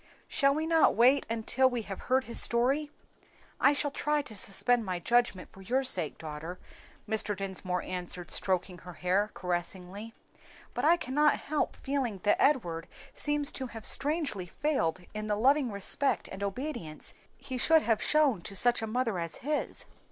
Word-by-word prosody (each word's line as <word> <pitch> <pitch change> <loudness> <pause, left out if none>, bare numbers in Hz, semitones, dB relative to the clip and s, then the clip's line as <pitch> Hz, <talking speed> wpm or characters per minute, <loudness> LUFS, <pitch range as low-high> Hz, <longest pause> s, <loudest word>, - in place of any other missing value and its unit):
"Shall 275 -1 +2
we 310 +1 -1
not 325 0 +4
wait 255 +5 +4
until 230 +3 +2
we 245 -3 -3
have 195 -2 -7
heard 260 +1 +3
his 235 - +2
story?" 270 +6 +3 0.7
"I - - +5
shall 290 0 -1
try 295 +1 0
to 225 -6 -8
suspend 230 +5 +2
my 185 -3 -3
judgment 235 0 +1
for 195 - -14
your 255 +8 0
sake, 180 - -1
daughter," 160 +3 -7 0.5
Mr. 210 -2 -1
Dinsmore 185 -2 -3
answered, 180 -1 -5
stroking 185 -1 0
her 180 +1 -10
hair 185 +4 0
caressingly, 185 +4 -4 0.6
"but - - -3
I 335 +3 +6
cannot 295 0 +2
help 300 0 -1
feeling 265 -7 -2
that 205 - +2
Edward 175 - +1 0.3
seems 295 -1 0
to 260 - -5
have 225 -2 -9
strangely 285 - +1
failed 185 - -1
in 215 0 -4
the 210 - +1
loving 265 +2 +3
respect 200 +7 0
and 195 - -7
obedience 200 - -4 0.2
he 255 -2 -6
should 320 +4 +4
have 225 -2 +1
shown 290 - +3
to 195 - -9
such 240 +5 +5
a 225 - -3
mother 225 -4 -1
as 170 -1 -4
his. 300 0 -2
230 Hz, 165 wpm, -30 LUFS, 185-275 Hz, 0.7 s, I